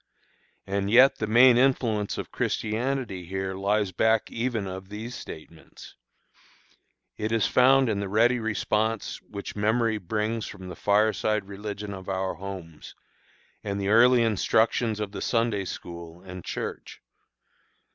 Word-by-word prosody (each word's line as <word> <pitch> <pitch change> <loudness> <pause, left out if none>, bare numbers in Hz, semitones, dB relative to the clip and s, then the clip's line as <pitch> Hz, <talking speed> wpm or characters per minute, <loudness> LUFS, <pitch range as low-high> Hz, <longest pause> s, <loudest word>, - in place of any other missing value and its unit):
And 100 0 -2
yet 125 +5 +6
the 110 - -1
main 120 +2 +6
influence 115 -6 +1
of - - -6
Christianity 115 -3 -2
here 95 +1 -3
lies 100 +1 0
back 110 +4 +1
even 115 -3 -2
of 95 0 -7
these 110 +4 -7
statements; 80 -6 -11 1.2
it 110 +1 -2
is 115 -3 +2
found 130 +1 +5
in 105 -3 0
the 100 -1 -3
ready 120 +4 +3
response 110 0 -1
which 100 -1 -8
memory 110 +1 +1
brings 105 +3 -2
from 95 -2 -9
the - - -7
fireside 105 0 +1
religion 100 0 -6
of 95 -1 -8
our 95 0 -1
homes, 90 -3 -9 0.7
and 100 -1 -3
the 100 0 -1
early 120 +2 +6
instructions 110 +1 +1
of 105 -2 -3
the - - -6
Sunday 115 -4 0
school 85 -1 -8
and 90 -2 -9
church. - - -6
105 Hz, 135 wpm, -26 LUFS, 95-115 Hz, 1.2 s, yet